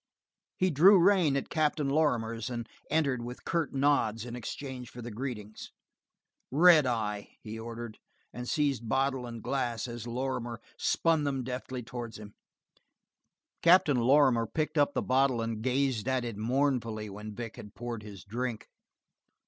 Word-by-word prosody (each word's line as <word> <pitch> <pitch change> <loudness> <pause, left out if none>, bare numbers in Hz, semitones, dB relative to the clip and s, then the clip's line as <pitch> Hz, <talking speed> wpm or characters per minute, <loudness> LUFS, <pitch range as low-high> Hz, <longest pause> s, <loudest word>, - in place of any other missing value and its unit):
He 185 0 +2
drew 185 +7 +7
rein 175 -6 +4
at 135 - -3
Captain 150 -2 +1
Lorrimer's 120 -7 0
and 120 -2 -4 0.2
entered 140 -6 +1
with 125 +1 -8
curt 165 -3 0
nods 135 -5 +1
in 120 -1 -6
exchange 125 0 -6
for 125 - -11
the 120 0 -6
greetings. 110 -3 -6 0.8
"Red 155 0 +6
eye," 105 -4 -2
he 110 +1 -6
ordered, 115 -1 -7 0.3
and 125 0 -6
seized 140 -7 0
bottle 135 0 0
and 115 -2 -8
glass 125 -4 -1
as 120 -1 -6
Lorrimer 120 -1 -3 0.2
spun 165 -2 +2
them 135 -3 -1
deftly 125 0 -5
towards 120 -1 -7
him. 105 -1 -11 1.3
Captain 170 -5 +5
Lorrimer 125 -2 +4
picked 155 +4 -1
up 145 0 +2
the - - 0
bottle 130 -1 +2
and 115 -1 -3
gazed 130 -2 0
at 130 -2 0
it 115 -3 -4
mournfully 115 -2 0
when 105 +1 -8
Vic 115 -1 -6
had 105 - -11
poured 120 -2 -5
his 105 -2 -10
drink. 115 +2 -4
125 Hz, 150 wpm, -30 LUFS, 115-140 Hz, 1.3 s, drew